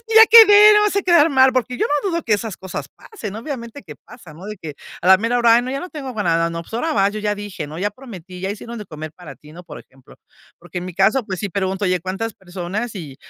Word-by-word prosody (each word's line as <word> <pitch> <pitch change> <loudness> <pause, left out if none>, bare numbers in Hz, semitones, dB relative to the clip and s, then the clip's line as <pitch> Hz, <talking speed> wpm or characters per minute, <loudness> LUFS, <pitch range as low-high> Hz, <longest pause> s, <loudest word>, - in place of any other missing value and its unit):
"Es - - -29
que 450 - -3
ya 445 0 +10
quedé, 425 -2 +8
no 420 - +5
vayas 420 -1 0
a 400 - +1
quedar 340 -4 +4
mal", 265 -1 +4
porque 250 -1 -2
yo - - 0
no 295 +7 -1
dudo 335 -1 -2
que 220 - -1
esas 215 -1 -5
cosas 190 -1 -7
pasen, 215 - -10
obviamente 235 0 -7
que 155 -6 -11
pasan, 180 -10 -14
¿no? 190 - -10
De 210 0 -7
que 155 -4 -9 0.3
a - - -3
la 190 0 +7
mera 230 +3 0
hora: 235 -1 +5
"¡Ay, 240 - +2
no!, 255 - -5
ya 275 - -3
no 360 - -8
tengo 270 -5 -7
ga 210 - -2
nada. 165 -1 +1
No, 165 0 -5
pues 170 - -19
ahora 320 +8 -1
va, 195 -1 +3
yo 215 0 -6
ya 210 0 -1
dije", 200 -6 -7
¿no? 155 +2 -9
Ya 205 +3 -1
prometí, 190 -7 -12
ya 190 - -3
hicieron 230 +3 -8
de 210 - -9
comer 155 -1 -9
para 175 -1 -12
ti", 150 0 -17
¿no?, 175 +2 -12
por - - -10
ejemplo. 130 0 -19 0.4
Porque 175 +1 -8
en 180 - -6
mi 180 - -8
caso, 215 +6 +2
pues 190 -2 -5
sí 200 - -4
pregunto: 190 +2 -2
"Oye, 185 -1 0
¿cuántas 195 +6 -4
personas?", 190 +5 -6
y 150 -8 -9
205 Hz, 290 wpm, -19 LUFS, 180-255 Hz, 0.4 s, ya